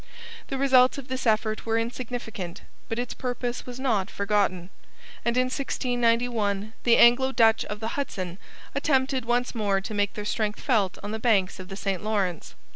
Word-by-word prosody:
The 270 - -3
results 260 -1 +5
of 270 -2 -8
this 260 -1 -2
effort 215 0 +1
were 225 0 0
insignificant, 230 -6 -4 0.3
but 225 - -2
its 245 0 -3
purpose 245 -1 -4
was 250 0 -7
not 220 -8 0
forgotten; 200 -3 0 0.5
and 235 +1 0
in 255 - +5
1691 235 -5 0
the 235 -1 +5
Anglo 255 +3 +6
Dutch 225 -3 +4
of 210 - -5
the 225 +1 -3
Hudson 190 -10 -4 0.3
attempted 265 -3 +1
once 245 +1 0
more 205 -4 +1
to 195 +3 -6
make 205 -1 0
their 210 - -5
strength 210 0 -1
felt 210 -9 +1
on 205 - -4
the 220 - -3
banks 200 -5 +2
of 185 - -8
the 195 - -7
St 195 -2 -2
Lawrence. 200 -6 -2
225 Hz, 175 wpm, -26 LUFS, 205-250 Hz, 0.5 s, Anglo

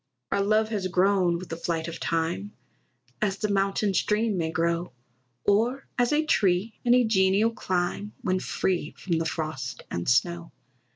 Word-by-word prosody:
Our 200 - +2
love 215 +2 +2
has 205 -4 -1
grown 185 -1 +2
with 185 +1 -9
the 165 - -3
flight 165 -1 -2
of 165 0 -6
time, 165 +5 -2 0.7
As 200 -2 0
the 210 - -1
mountain 195 +1 +1
stream 210 +3 +1
may 165 -3 -1
grow; 170 -1 -1 0.5
Or 235 +7 +2
as 245 -1 +2
a 305 +1 +2
tree 200 - +2
in 245 0 +5
a 250 - +5
genial 205 0 +3
clime 185 0 -2
When 185 0 +1
free 180 -4 -2
from 170 -3 -1
the 165 - -1
frost 155 -6 -4
and 85 0 -2
snow. 170 +7 +1
190 Hz, 165 wpm, -26 LUFS, 170-210 Hz, 0.7 s, in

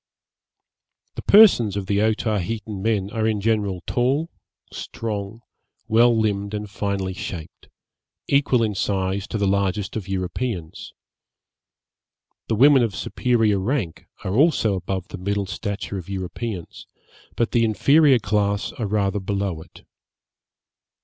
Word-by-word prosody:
The - - -6
persons 125 - +6
of 100 - -3
the 100 +1 0
Otaheitan 110 -1 -1
men 105 -2 0
are 110 -1 0
in 110 -2 0
general 100 -4 -1
tall, 135 +7 0 0.4
strong, 110 0 -5 0.5
well 115 +1 +4
limbed 100 -1 -1
and 105 0 -4
finely 100 -1 -3
shaped; 85 -3 -8 0.6
equal 135 -4 +3
in 110 -2 0
size 95 0 -1
to - - -3
the 100 - 0
largest 100 0 0
of 105 -4 -4
Europeans. 95 -1 -4 1.5
The 110 - 0
women 135 +3 +6
of 115 -4 0
superior 115 -5 +1
rank 100 - -2 0.2
are 95 - -2
also 135 -5 +3
above 95 0 -4
the 100 - -8
middle 100 +2 -1
stature 100 0 -4
of 90 - -11
Europeans, 95 0 -6 0.5
but 115 - 0
the 120 - +3
inferior 140 +5 +4
class 100 -1 0
are 115 -6 -4
rather 100 0 0
below 100 -4 -2
it. - - -16
105 Hz, 130 wpm, -22 LUFS, 95-115 Hz, 1.5 s, persons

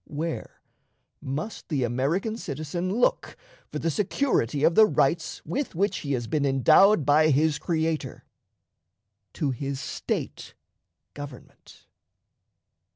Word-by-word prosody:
Where 160 +2 -5 0.6
must 150 +11 -5
the 145 -6 0
American 140 - -1
citizen 170 - -4
look 235 +5 0 0.3
for - - -3
the 165 +2 -1
security 165 - 0
of 165 - +5
the 215 +4 +7
rights 160 +2 0
with 275 -7 -3
which 200 +2 0
he 140 -1 -3
has 120 -2 -2
been 150 +4 -1
endowed 140 - +5
by 155 +2 +4
his 150 +1 +2
Creator? 160 -2 -2 1.1
To 145 -3 -1
his 135 +2 -4
State - - -4 0.6
government. 145 -4 -12
155 Hz, 115 wpm, -26 LUFS, 140-175 Hz, 1.1 s, the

